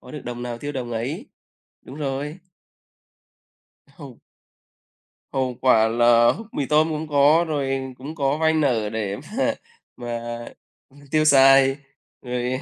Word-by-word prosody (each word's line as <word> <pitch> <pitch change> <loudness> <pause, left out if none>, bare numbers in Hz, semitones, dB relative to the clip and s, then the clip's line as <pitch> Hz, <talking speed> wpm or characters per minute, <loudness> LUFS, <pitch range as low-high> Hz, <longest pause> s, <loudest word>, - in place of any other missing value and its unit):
có - - -14
được 150 - -7
đồng 120 0 -6
nào 120 -1 -5
tiêu 145 +3 -5
đồng 125 -3 -5
ấy. 120 +7 -4 0.6
Đúng 135 - -11
rồi. 145 +2 -4 1.6
Hông. 140 -5 -12 1.1
Hậu 130 -2 -1
quả 115 -4 +4
là 120 0 +4 0.2
mì 140 - -2
tôm 155 +2 +2
cũng 155 - -2
không 155 - -6
có, 150 +3 +4
rồi 135 -3 -2
cũng 145 +5 -8
có 140 -1 0
vay 160 0 +2
nợ 125 -9 +1
để 105 -2 -3
mà 275 +4 0 0.4
mà 120 -1 -5 0.9
tiêu 155 0 +2
xài 135 -1 +6 0.4
rồi 125 +1 -3
135 Hz, 140 wpm, -22 LUFS, 120-150 Hz, 1.6 s, xài